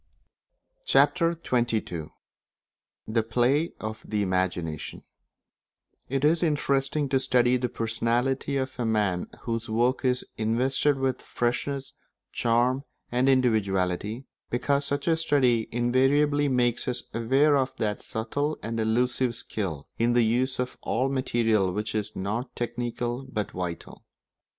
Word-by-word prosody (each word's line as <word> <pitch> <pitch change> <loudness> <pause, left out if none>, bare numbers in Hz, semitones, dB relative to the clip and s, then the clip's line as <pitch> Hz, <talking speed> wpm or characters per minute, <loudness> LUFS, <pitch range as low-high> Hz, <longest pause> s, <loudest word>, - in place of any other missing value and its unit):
Chapter 170 -2 +3
XXII 110 -10 0 1.0
The 115 +1 +2
Play 125 +8 +1
of 110 0 -6
the 105 -1 -1
Imagination 90 -4 -2 1.1
It 135 +2 +1
is 160 +2 +3
interesting 145 -2 +1
to 135 0 +3
study 125 -1 +3
the 125 -1 0
personality 120 +5 0
of 130 -1 -3
a - - 0
man 105 -5 +1
whose 115 -1 -3
work 120 +5 +1
is 125 -1 +1
invested 130 +6 +1
with 130 -1 -1
freshness, 135 +3 -2 0.4
charm, 120 +3 +1 0.3
and 125 +2 +2
individuality, 110 -2 +1 0.2
because 140 +3 +1
such 140 +2 -2
a 165 - +4
study 130 -8 +2
invariably 135 +5 +3
makes 125 -3 +1
us 125 -1 -1
aware 135 +6 +3
of 130 -1 0
that 105 -2 -1
subtle 145 +7 -2
and 115 0 -3
elusive 120 +2 +1
skill 90 -11 -4
in 120 +1 +3
the 120 -1 +4
use 125 +4 +1
of 125 0 -3
all 130 +3 0
materials 115 -8 +1
which 105 +1 -2
is 105 0 -3
not 110 +7 -3
technical 120 +2 -3
but 105 -4 -2
vital. 90 -2 -6
120 Hz, 125 wpm, -27 LUFS, 110-135 Hz, 1.1 s, a